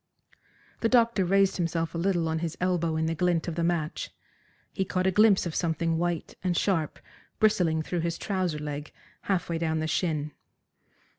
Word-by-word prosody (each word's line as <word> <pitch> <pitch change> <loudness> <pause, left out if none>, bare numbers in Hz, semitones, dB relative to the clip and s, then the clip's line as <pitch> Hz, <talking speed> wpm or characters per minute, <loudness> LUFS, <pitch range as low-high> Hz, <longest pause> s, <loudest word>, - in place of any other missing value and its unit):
The 230 - +1
doctor 235 -5 +4
raised 195 +1 +3
himself 165 -2 -1
a - - -3
little 175 -2 +1
on 160 0 -1
his 165 -1 -4
elbow 175 -3 0
in 160 0 0
the 165 - 0
glint 175 0 +1
of 170 - -2
the 170 +1 -1
match. 165 -3 -1 0.6
He 190 - 0
caught 185 0 -1
a 190 - +3
glimpse 210 0 +5
of 170 - -3
something 165 -1 0
white 175 -2 -2
and 180 -2 0
sharp 165 -7 0 0.4
bristling 175 -7 +2
through 175 +2 -2
his 170 0 -2
trouser 185 -6 -1
leg 150 0 -5 0.4
half 190 -3 +1
way 165 -1 -2
down 160 -1 0
the 155 - -1
shin. 155 -2 -1
170 Hz, 180 wpm, -27 LUFS, 160-185 Hz, 0.6 s, glimpse